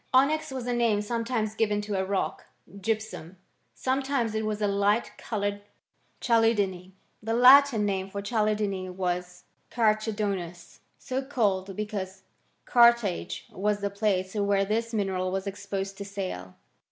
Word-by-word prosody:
Onyx 310 +4 +3
was 260 -2 -5
a 245 - -1
name 230 -3 +2
sometimes 230 -1 -2
given 210 -2 +1
to 205 0 -5
a 190 -1 0
rock 195 0 -2 0.2
j 200 - -13 0.2
gypsum; 200 -5 -10 0.4
sometimes 265 -3 0
it 220 0 -1
¥ras 215 -1 -2
a 210 - +1
light 200 +2 +1
coloured 205 -2 -2 0.6
chalcedony 205 -6 +1
» - - -43
The 225 +1 -1
Latin 255 -2 +7
name 195 -1 -1
for 200 - -5
chalcedony 210 -3 -1
was 180 -1 -3 0.3
carchedonius, 210 -6 -1 0.2
so 260 +1 -3
called 200 -8 -1
because 195 -2 -5 0.4
Carthage 235 -6 +3
was 205 +1 -1
the 200 0 -1
place 195 -2 0
where 200 -2 +1
this 225 +3 -1
mineral 190 -4 -1
was 190 +1 -2
exposed 195 0 -5
to - - -3
sale. 185 - -6
205 Hz, 140 wpm, -27 LUFS, 195-225 Hz, 0.6 s, Latin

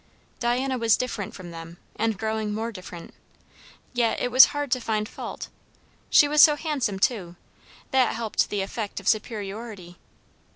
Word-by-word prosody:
Diana 255 +2 0
was 225 -3 +3
different 225 -6 -4
from 180 -3 -9
them, 165 +1 -9 0.2
and 225 -1 -1
growing 220 -1 -2
more 225 +2 -3
different; 180 -4 -10 0.8
yet 240 -2 +1
it 245 - -1
was 255 +2 +10
hard 290 -2 -4
to 255 - +1
find 215 -2 -1
fault. - - -7 0.6
She 290 - +6
was 300 +1 +4
so 300 -2 +8
handsome, 290 - -2
too; 190 -4 0 0.6
that 260 -3 +3
helped 225 -2 -1
the 205 -1 -1
effect 205 +2 -4
of 195 - -10
superiority. 210 -4 -3
220 Hz, 155 wpm, -25 LUFS, 200-250 Hz, 0.8 s, was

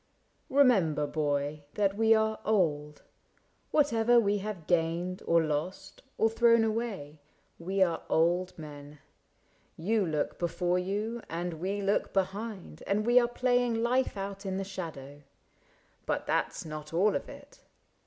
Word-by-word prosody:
Remember, 195 - +4
boy. 145 0 -1
That 200 -1 +1
we 225 +1 +5
are 220 0 +1
old. 150 -8 0 0.7
Whatever 240 -5 +4
we 205 -2 +1
have 195 -5 -6
gained. 175 +2 0
Or 170 -1 +4
lost, 160 +6 -4 0.2
or 220 - +4
thrown 230 0 +4
away, 215 -10 -3 0.4
we 190 +3 +1
are 170 -3 0
old 175 +3 +1
men. 145 -1 -10 0.8
You 210 +6 +1
look 155 -4 -2
before 175 +1 0
you 210 +5 -3
and 170 +1 -3
we 200 +2 -2
look 200 +1 0
behind. 195 - -3
And 210 +2 +1
we 240 +1 +6
are 240 - +2
playing 245 -2 +1
life 250 -2 +1
out 195 0 -5
in 190 -1 -3
the 195 - -2
shadow 160 -7 -7 0.4
— - - -36
But - - -1
that - - 0
's - - -8
not 155 0 -7
all 200 +5 +3
of - - -3
it. - - -13
190 Hz, 145 wpm, -30 LUFS, 160-220 Hz, 0.8 s, we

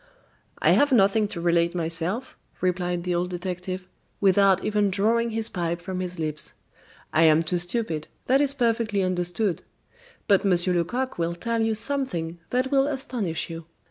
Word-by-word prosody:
"I - - +3
have 290 0 +4
nothing 210 -2 +4
to 190 - -7
relate 170 0 +2
myself," 170 +9 -2 0.2
replied 180 -1 -1
the 180 0 -1
old 175 +1 0
detective, 180 +1 -5 0.3
without 195 -1 +4
even 210 -1 +2
drawing 225 +5 +2
his 225 0 0
pipe 170 -5 -2
from 185 +1 -5
his 180 0 -4
lips, 155 -2 -3 0.6
"I 155 - +4
am 160 +1 +5
too 175 +2 -1
stupid, 175 -4 -3 0.2
that 270 +2 +3
is 280 -1 +3
perfectly 230 -5 +1
understood. 180 +1 -1 0.7
But 200 -3 +4
Monsieur 180 -2 +2
Lecoq 210 +8 -1
will 170 0 -1
tell 230 +5 -1
you 225 0 +1
something 205 -10 -2
that 255 +2 0
will 275 0 +3
astonish 250 - -3
you." 165 0 -7
185 Hz, 160 wpm, -25 LUFS, 175-225 Hz, 0.7 s, am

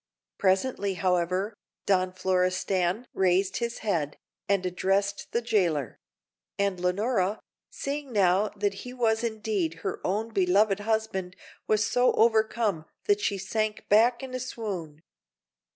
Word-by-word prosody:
Presently, 195 +1 +1
however, 185 +3 0 0.3
Don 185 -2 +2
Florestan 185 +2 0
raised 190 +1 +2
his 235 0 -2
head, 160 -8 -1 0.3
and 200 -2 +2
addressed 195 +2 0
the 235 - 0
jailer; 175 - 0 0.6
and 200 -2 0
Leonora, 195 +2 0 0.3
seeing 280 -1 -4
now 200 -1 +3
that 200 0 0
he 250 - -8
was 225 -2 +1
indeed 210 -8 -2
her 195 - -2
own 210 +5 -1
beloved 195 +1 +3
husband, 205 -4 -2 0.3
was 215 -1 +3
so 245 +3 +3
overcome 220 -6 +2 0.2
that 205 0 +2
she 200 - 0
sank 215 +3 -2
back 235 +4 +4
in 260 -1 -7
a 255 - -2
swoon. 190 -11 -5
200 Hz, 125 wpm, -27 LUFS, 185-220 Hz, 0.6 s, back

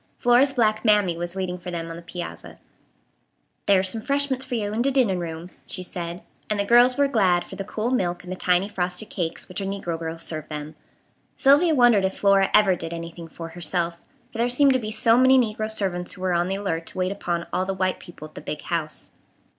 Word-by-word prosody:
Flora's 245 +3 +4
black 215 -5 +1
"Mammy" 210 -6 +3
was 175 +1 -5
waiting 180 -1 -3
for 180 - -7
them 170 -1 -4
on - - -6
the 170 - -9
piazza. 175 +1 -8 1.1
"Thar's 190 -1 +4
some 225 +3 -3
'freshments 275 +1 0
fur 250 - -4
yo' 210 -2 -2
in 225 - 0
de 270 - +2
dinin' 245 -9 +2
room," 170 +1 -6 0.2
she 185 - -3
said; 175 -1 -5 0.3
and 210 -1 0
the 200 - +1
girls 240 +4 +5
were 285 0 +4
glad 190 -9 +2
for - - -10
the 195 - -4
cool 215 +4 -3
milk 180 -8 -1
and 180 - -8
the - - -2
tiny 180 +1 +2
frosted 185 +1 -3
cakes 170 -4 -3
which 185 +2 -5
a - - -2
negro 195 -4 -3
girl 165 0 -4
served 155 -2 -6
them. 150 0 -6 0.6
Sylvia 300 +4 +4
wondered 240 -6 +5
if 190 - -2
Flora 195 -1 +4
ever 195 -3 +5
did 165 -1 -6
anything 170 0 -7
for 165 +1 -8
herself; 170 0 -2 0.3
for 225 - -8
there 240 +1 +2
seemed 270 +2 +5
to 260 - +2
be 215 -3 -4
so 225 +2 +3
many 260 +1 +6
negro 215 -3 0
servants 185 -5 -2
who 185 - -12
were 185 -1 0
on 175 +1 +1
the 190 - -1
alert 170 -5 -3
to - - -8
wait 185 0 0
upon 175 -3 -3
all 185 - 0
the 195 - -2
white 185 0 -1
people 160 -3 -11
at 155 - -23
the - - -9
"big 150 - -5
house." 160 -3 -4
190 Hz, 230 wpm, -24 LUFS, 175-225 Hz, 1.1 s, many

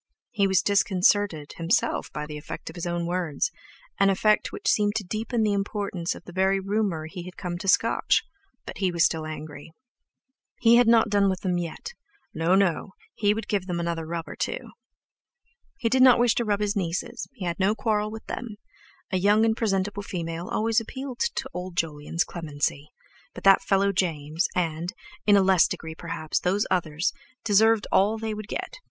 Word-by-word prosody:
He 200 -5 +2
was 190 -2 +3
disconcerted 195 -5 +2
himself 165 +5 0
by 150 - -4
the 150 0 -8
effect 150 +2 -7
of - - -17
his 175 0 -4
own 175 0 -2
words—an 180 - -2
effect 210 +2 +2
which 425 - -6
seemed 210 - +2
to 225 - -1
deepen 220 +4 -2
the 210 -1 +2
importance 200 -3 -2
of - - -12
the 175 - -11
very 190 +2 +2
rumour 195 -5 -1
he 180 +3 -7
had 185 - -10
come 175 -1 -4
to 195 - -6
scotch; 190 - +3 0.4
but - - -8
he 190 -2 +1
was 170 -1 +3
still 160 -1 -1
angry. 155 0 -8 0.9
He 235 -1 +6
had 245 -1 +5
not 230 -1 +5
done 200 -1 +3
with 185 -1 -2
them 180 -2 0
yet—No, 185 - -3
no—he 195 +2 0
would 225 - -5
give 195 -3 -1
them 175 -2 -2
another 170 -1 -3
rub 165 0 -4
or - - -8
two. - - -4 1.1
He 235 - -1
did 260 +3 +3
not 255 -1 +8
wish 240 -1 +4
to 235 - -1
rub 205 -1 0
his 205 0 0
nieces, 180 -3 -3
he 195 - -6
had 170 +1 -3
no 200 +3 +2
quarrel 215 -2 0
with 220 +1 -9
them—a 210 -4 -7
young 205 +4 +4
and 220 -1 +2
presentable 205 -2 -1
female 170 -2 -5
always 225 +1 +1
appealed 260 +2 -7
to - - -1
old 180 0 -6
Jolyon's 160 +1 -1
clemency—but 145 -2 -6
that 195 0 +7
fellow 195 0 +2
James, 160 -4 -1
and, 170 +1 -1 0.3
in 205 -1 +7
a 195 - +4
less 190 -2 +5
degree 160 0 -6
perhaps, 160 -1 -3
those 195 +4 +1
others, 165 -1 0 0.3
deserved 220 0 +4
all 210 +3 +3
they 220 0 -3
would 215 -1 -7
get. - - -5
190 Hz, 180 wpm, -26 LUFS, 170-215 Hz, 1.1 s, not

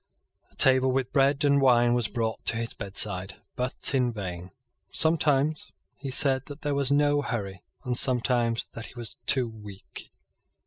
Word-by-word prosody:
A - - -25
table 130 0 +5
with 130 -1 -2
bread 140 +1 +2
and 140 -1 +3
wine 120 -2 +3
was 120 -2 0
brought 110 -1 -4
to 115 - +5
his 115 0 -4
bedside, 95 -1 -1 0.2
but 125 +1 +2
in 125 -2 +1
vain. 90 -4 -7 0.4
Sometimes 155 -2 +1 0.2
he 140 - -8
said 130 0 +1
that 145 +1 -11
there 145 -1 -1
was 140 -1 +1
no 145 0 +2
hurry, 100 -8 -5 0.2
and 125 -2 -3
sometimes 120 -2 +1
that 115 - -9
he - - -14
was 120 -2 -9
too 130 -3 +1
weak. 105 -3 -12
125 Hz, 165 wpm, -26 LUFS, 115-140 Hz, 0.4 s, table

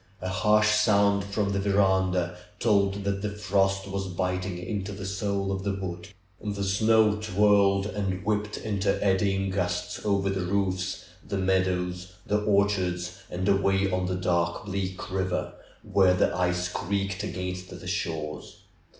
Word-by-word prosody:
A 95 - -4
harsh 105 +2 +3
sound 100 -1 +3
from 100 0 -1
the 100 - 0
veranda, 95 -3 +2 0.2
told 100 -3 +2
that 100 0 -1
the 105 - -1
frost 100 -1 0
was 100 0 -3
biting 90 0 -2
into 100 +2 -4
the 95 0 -6
soul 100 0 -1
of 95 0 -3
the 100 -1 -1
wood. 90 -2 -5 0.4
The 100 -1 -2
snow 105 +2 +3
twirled 100 -1 +3
and 95 -3 -3
whipped 105 0 -1
into 100 -2 0
eddy 95 0 +2
ing 95 0 -1
gusts 100 +4 -2
over 100 -2 +1
the 95 -1 -2
roofs, 95 0 -1 0.2
the 100 - -3
meadows, 90 -1 0
the 105 0 +1
orchards, 95 -3 +1
and 90 +2 -3
away 100 0 +2
on 90 0 0
the 90 - -1
dark, 85 0 0
bleak 95 -1 -4
river, 95 -1 -1 0.3
where 95 -2 +4
the - - +2
ice 90 0 0
creaked 100 +1 -2
against 90 -1 -4
the - - -10
shores. 75 -2 -4
95 Hz, 150 wpm, -27 LUFS, 90-100 Hz, 0.4 s, where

